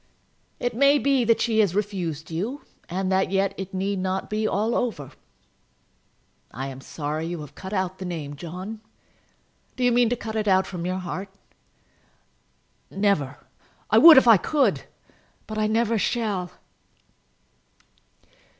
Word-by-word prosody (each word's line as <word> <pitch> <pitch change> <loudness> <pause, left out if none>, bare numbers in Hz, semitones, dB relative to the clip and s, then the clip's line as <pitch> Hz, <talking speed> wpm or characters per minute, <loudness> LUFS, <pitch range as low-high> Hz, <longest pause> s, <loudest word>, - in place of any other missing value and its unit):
"] - - -42
"It 245 - -3
may 280 +3 +5
be 275 -3 +2
that 230 0 +3
she 225 -2 +1
has 200 -4 +2
refused 175 -7 -3
you, 215 - -4 0.3
and 185 +2 -2
that 190 0 +2
yet 195 0 +1
it 190 -1 -6
need 195 +1 -2
not 190 +1 -3
be 215 0 0
all 215 +4 0
over. 210 - -2 1.4
I 135 +2 -5
am 135 0 -9
sorry 150 +3 -4
that - - -4
you 175 -2 -5
have 150 -2 -10
cut 190 - -9
out 185 -2 -2
the 190 - -5
name, 155 -5 -5
John. 185 +8 -7 0.9
Do 255 - -3
you 245 - +4
mean 240 -1 +3
to 245 - 0
cut 225 -2 -7
it 215 -1 -1
out 190 -1 +4
from 180 -2 -5
your 185 0 -2
heart?" 185 +2 -5 1.6
"Never. 190 -9 0 0.5
I - - +6
would 325 -3 +10
if 265 - +6
I 225 -3 +8
could, 285 - +1 0.6
but 215 0 -5
I 215 - +2
never 225 0 +1
shall." 205 -6 -1
195 Hz, 160 wpm, -24 LUFS, 175-225 Hz, 1.6 s, would